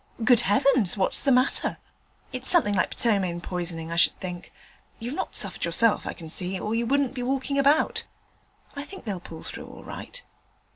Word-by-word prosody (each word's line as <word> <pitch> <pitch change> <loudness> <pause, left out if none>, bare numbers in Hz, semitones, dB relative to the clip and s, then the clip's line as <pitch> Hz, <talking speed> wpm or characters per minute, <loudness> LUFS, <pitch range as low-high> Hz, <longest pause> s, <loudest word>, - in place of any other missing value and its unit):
'Good 240 -1 +5
heavens! 235 -2 +2
what's 190 - +3
the 275 - +3
matter?' 255 +1 +3 0.6
'It's 255 0 -2
something 325 - +3
like 190 - 0
ptomaine 195 -7 +2
poisoning, 170 -2 -4
I 170 - -3
should 165 - +3
think: 180 -1 -7 0.5
you've 240 +3 -5
not - - -4
suffered 200 -6 -2
yourself, 190 +7 +2
I - - -3
can 165 - -10
see, 180 +3 -1
or 210 - -3
you 230 +1 0
wouldn't 275 0 +1
be 255 - -5
walking 270 +2 -1
about. 285 +3 +3 0.7
I 280 - -4
think 380 0 -11
they'll 200 -5 -3
pull 165 -2 -10
through - - -8
all - - -12
right.' - - -8
225 Hz, 185 wpm, -26 LUFS, 180-260 Hz, 0.7 s, Good